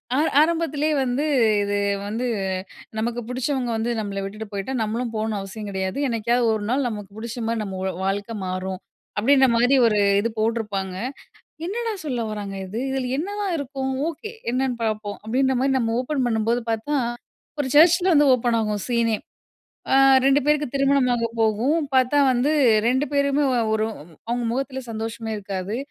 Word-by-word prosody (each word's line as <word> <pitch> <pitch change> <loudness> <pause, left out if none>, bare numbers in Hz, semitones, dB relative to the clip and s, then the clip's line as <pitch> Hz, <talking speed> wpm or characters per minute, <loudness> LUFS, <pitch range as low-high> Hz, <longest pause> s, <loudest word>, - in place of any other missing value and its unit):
ஆ - - +2 0.2
ஆரம்பத்திலே 315 -2 +1
வந்து, 255 +3 -1 0.4
இது 205 0 0 0.3
வந்து, 230 +4 -2 0.7
"நமக்கு 235 +2 -1
புடிச்சவங்க 255 0 -1
வந்து 230 +2 -1
நம்பள 200 -2 -3
விட்டுட்டு 215 +3 -6
போயிட்டா, 200 +6 -4
நம்மளும் 225 +2 -2
போகணும்ன்னு 215 -1 -1
அவசியம் 200 +2 -7
கிடையாது. 190 +1 -3
என்னைக்காவது 235 +1 +1
ஒரு 210 - -4
நாள் 260 +2 +1
நமக்கு 205 -3 -7
புடிச்சமாரி 230 0 -3
நம்மளோட 190 -1 -3
வாழ்க்கை 205 +3 -2
மாறும்." 185 0 -3 0.4
அப்படீன்றமாரி 255 +1 +4
ஒரு 210 -2 +3 0.2
இது 230 +3 0
போட்டிருப்பாங்க. 210 -4 -1 0.7
"என்னடா 455 +4 -2
சொல்ல 245 -5 -2
வராங்க 205 -2 -5
இது. 200 +5 -5
இதுல 265 -2 -2
என்ன 345 - -2
தான் 385 -4 -1
இருக்கும்? 270 -1 -3 0.2
ஓகே 335 +7 -6 0.2
என்னன்னு 255 -1 0
பார்ப்போம்." 215 -2 -2
அப்படீன்றமாரி 265 +3 +1
நம்ம 225 -2 0
ஓப்பன் 260 0 -1
பண்ணும்போது 230 +1 +1
பார்த்தா, 225 +7 -1 0.6
ஒரு 260 - 0
சர்ச்சில 350 +3 +6
வந்து 290 0 +5
ஓப்பன் 235 -1 +1
ஆகும் 210 -2 -2
சீனே! 230 -2 +2 0.8
ஆ - - +6 0.3
2 275 +1 +4
பேருக்கு 300 -3 +1
திருமணமாக 255 -4 +2
போகும், 225 +8 +2 0.2
பார்த்தா 260 +3 +3
வந்து 255 +5 +1 0.4
2 260 +4 +1
பேருமே 280 +1 +2
ஒ - - +1 0.2
ஒரு 220 0 +1 0.4
அவுங்க 240 0 -1
முகத்தில 265 0 -3
சந்தோஷமே 225 0 -4
இருக்காது. 195 +1 -4
235 Hz, 150 wpm, -23 LUFS, 215-270 Hz, 0.8 s, சர்ச்சில